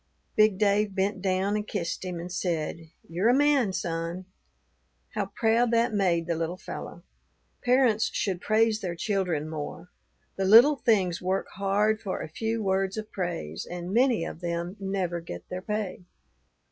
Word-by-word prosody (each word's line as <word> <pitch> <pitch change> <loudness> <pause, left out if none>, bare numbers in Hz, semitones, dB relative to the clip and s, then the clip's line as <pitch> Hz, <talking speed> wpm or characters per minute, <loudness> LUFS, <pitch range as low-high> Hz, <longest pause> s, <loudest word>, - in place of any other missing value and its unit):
Big 215 -2 +4
Dave 205 0 +2
bent 195 +1 0
down 190 +1 +1
and 210 0 -2
kissed 170 +2 -3
him, 180 -2 -4
and 175 +1 -6
said, 165 -2 -2 0.2
'You're 180 +7 +1
a 245 - +5
man, 280 -6 +3
son.' 170 0 -3 0.9
How - - -1
proud 230 +1 +2
that 230 -1 +3
made 180 -5 +2
the 170 - 0
little 165 +2 -2
fellow! - - -8 0.6
Parents 245 -3 +3
should 185 -3 -1
praise 220 0 +2
their 175 -3 -3
children 180 -6 -1
more; 155 +3 -6 0.5
the 195 - 0
little 240 +9 +8
things 190 -9 +2
work 185 +1 0
hard 205 +2 +1
for 190 - -3
a - - -5
few 225 +7 -2
words 190 +1 0
of 215 0 -5
praise, 170 - -4
and 175 +1 -5
many 240 -6 +3
of 165 - -7
them 170 +1 -3
never 190 -3 -2
get 85 - -8
their 180 0 -4
pay. 210 -2 -3
190 Hz, 160 wpm, -27 LUFS, 175-215 Hz, 0.9 s, little